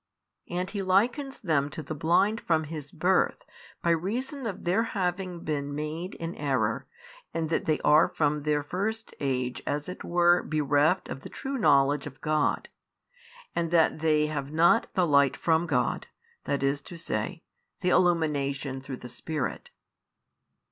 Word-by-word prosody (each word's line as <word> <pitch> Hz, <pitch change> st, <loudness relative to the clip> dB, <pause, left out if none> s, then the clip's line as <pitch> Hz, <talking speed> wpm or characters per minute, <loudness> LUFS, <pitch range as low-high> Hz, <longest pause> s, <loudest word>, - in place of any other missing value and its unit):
And 180 Hz, +1 st, -2 dB
He 200 Hz, 0 st, -3 dB
likens 240 Hz, +9 st, +1 dB
them 150 Hz, -, +1 dB
to 155 Hz, +2 st, -7 dB
the 155 Hz, -, -5 dB
blind 175 Hz, +8 st, +2 dB
from 160 Hz, -2 st, +1 dB
his 150 Hz, -2 st, -7 dB
birth 190 Hz, -, +1 dB, 0.4 s
by 170 Hz, -, +3 dB
reason 235 Hz, -, -2 dB
of 195 Hz, -, -5 dB
their 180 Hz, +5 st, +2 dB
having 185 Hz, -5 st, -2 dB
been 145 Hz, -2 st, -3 dB
made 155 Hz, +5 st, -4 dB
in 165 Hz, +1 st, -5 dB
error 130 Hz, -7 st, -1 dB, 0.5 s
and 160 Hz, -1 st, -1 dB
that -, -, 0 dB
they 155 Hz, -1 st, +1 dB
are 150 Hz, +2 st, +6 dB
from 150 Hz, -1 st, 0 dB
their 150 Hz, 0 st, 0 dB
first 215 Hz, +8 st, -3 dB
age 125 Hz, -2 st, -1 dB
as 145 Hz, 0 st, -2 dB
it 180 Hz, -, -7 dB
were 175 Hz, 0 st, +4 dB
bereft 150 Hz, +3 st, +2 dB
of -, -, -6 dB
the -, -, -10 dB
|684 -, -, -19 dB
true 270 Hz, 0 st, -3 dB
knowledge 145 Hz, -4 st, +3 dB
of 135 Hz, -2 st, -11 dB
God, 155 Hz, -1 st, +1 dB, 0.9 s
and 170 Hz, -1 st, 0 dB
that 160 Hz, -2 st, +3 dB
they 155 Hz, -1 st, +3 dB
Have 145 Hz, -2 st, -3 dB
not 170 Hz, +8 st, +4 dB
the 185 Hz, -, +3 dB
light 140 Hz, -3 st, +4 dB
from 165 Hz, +1 st, +2 dB
God, 135 Hz, -6 st, 0 dB, 0.4 s
i. -, -, +2 dB
e., -, -, 0 dB
the 155 Hz, +6 st, -2 dB, 0.5 s
illumination 145 Hz, -7 st, +1 dB
through 130 Hz, -1 st, -6 dB
the 125 Hz, -, -9 dB
Spirit. 145 Hz, +2 st, -4 dB
160 Hz, 155 wpm, -28 LUFS, 145-180 Hz, 0.9 s, are